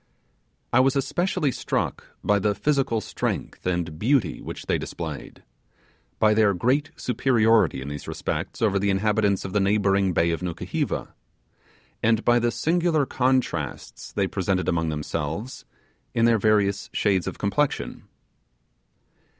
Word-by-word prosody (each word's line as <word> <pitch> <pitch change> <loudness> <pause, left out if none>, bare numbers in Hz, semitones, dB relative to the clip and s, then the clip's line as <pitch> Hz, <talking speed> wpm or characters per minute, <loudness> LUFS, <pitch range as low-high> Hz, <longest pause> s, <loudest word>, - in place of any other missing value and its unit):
I 125 - +6
was 130 +1 +3
especially 155 +1 0
struck - - -2 0.2
by 105 0 +3
the 105 +1 +1
physical 135 -6 +1
strength - - -4
and 85 -4 -2
beauty 115 - +1
which - - -7
they - - 0
displayed, - - -7 0.7
by 110 -1 +4
their 105 -2 +3
great 135 - +1
superiority 115 - +2
in - - -8
these 75 -1 -7
respects - - -3
over 100 -3 +3
the 100 +1 +1
inhabitants 100 0 +1
of 95 - -6
the 105 - +3
neighbouring 100 -1 +2
bay 85 0 +2
of 85 - -2
Nukuheva, 85 -2 -3 0.9
and 110 0 +2
by 120 0 +5
the 120 0 +1
singular 165 +1 +1
contrasts 125 - -1
they 100 - 0
presented 95 -1 -1
among 80 -2 +1
themselves 80 - -4 0.5
in 115 - +3
their 115 -1 +4
various 100 -1 +2
shades 95 -4 +1
of - - -4
complexion. 140 +9 -1
105 Hz, 135 wpm, -25 LUFS, 95-125 Hz, 0.9 s, I